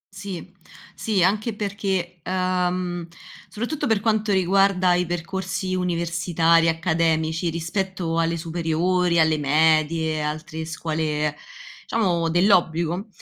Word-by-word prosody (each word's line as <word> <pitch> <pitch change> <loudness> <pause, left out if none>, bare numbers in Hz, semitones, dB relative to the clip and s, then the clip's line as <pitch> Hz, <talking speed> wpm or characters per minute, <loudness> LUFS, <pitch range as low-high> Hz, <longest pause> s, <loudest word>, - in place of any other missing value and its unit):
Sì. 190 -2 -7 0.4
Sì, 200 -5 0
anche 215 +4 +1
perché, 190 -4 -3
uhm, 180 -1 -1 0.4
soprattutto 240 +8 -3
per 220 -2 +2
quanto 215 -1 +1
riguarda 190 -1 +3
i 180 -1 +1
percorsi 185 +2 -3
universitari 170 -2 +2
e - - +5
accademici 165 0 0
rispetto 170 0 -2
alle 165 0 +1
superiori, 170 +1 0
alle 155 -1 +3
medie, 155 +1 +2
altre 155 +1 -4
scuole, 155 -2 -2 0.5
diciamo, 175 -7 0
dell'obbligo, 175 +1 +2
175 Hz, 105 wpm, -23 LUFS, 160-190 Hz, 0.5 s, e